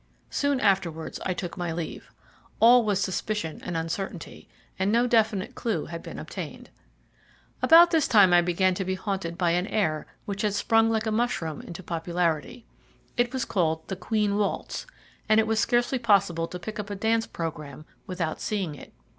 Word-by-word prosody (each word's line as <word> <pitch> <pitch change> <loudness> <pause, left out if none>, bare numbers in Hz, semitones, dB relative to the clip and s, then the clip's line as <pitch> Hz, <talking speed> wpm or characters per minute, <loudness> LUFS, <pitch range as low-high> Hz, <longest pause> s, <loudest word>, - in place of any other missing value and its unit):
Soon 285 -2 +1
afterwards 180 -8 0
I 185 - -1
took 175 -2 -5
my 175 -2 -2
leave. 165 0 -6 0.5
All 240 +2 +7
was 205 -3 +1
suspicion 195 -2 -2
and 175 -2 -3
uncertainty, 165 +2 -5 0.3
and 190 +2 +1
no 235 +2 +3
definite 220 -2 +1
clue 230 -4 -2
had 170 0 -7
been - - -9
obtained. - - -7 0.9
About 335 +2 +8
this 320 -3 +3
time 200 -6 +6
I 175 - +7
began 180 +2 +2
to 190 - -2
be 190 0 -2
haunted 190 -3 -4
by 175 -3 +2
an 180 +3 0
air 155 -10 -1 0.2
which 200 -1 -4
had 210 -2 0
sprung 225 +2 +3
like 220 0 0
a 220 - 0
mushroom 215 -9 -1
into 175 +1 -9
popularity. 170 +5 -2 0.5
It 240 -1 +1
was 260 -1 -2
called 160 -4 -1
the 190 - -2
"Queen 205 +2 0
Waltz," 205 - -2 0.4
and 215 0 +6
it 220 - +3
was 220 0 0
scarcely 240 +4 +1
possible 200 -7 +2
to 180 - -6
pick 210 +5 -7
up 210 0 -5
a 205 - -4
dance 225 +3 +1
programme 155 -3 -6 0.2
without 175 -4 -3
seeing 195 -7 -2
it. 145 - -12
195 Hz, 180 wpm, -26 LUFS, 170-220 Hz, 0.9 s, About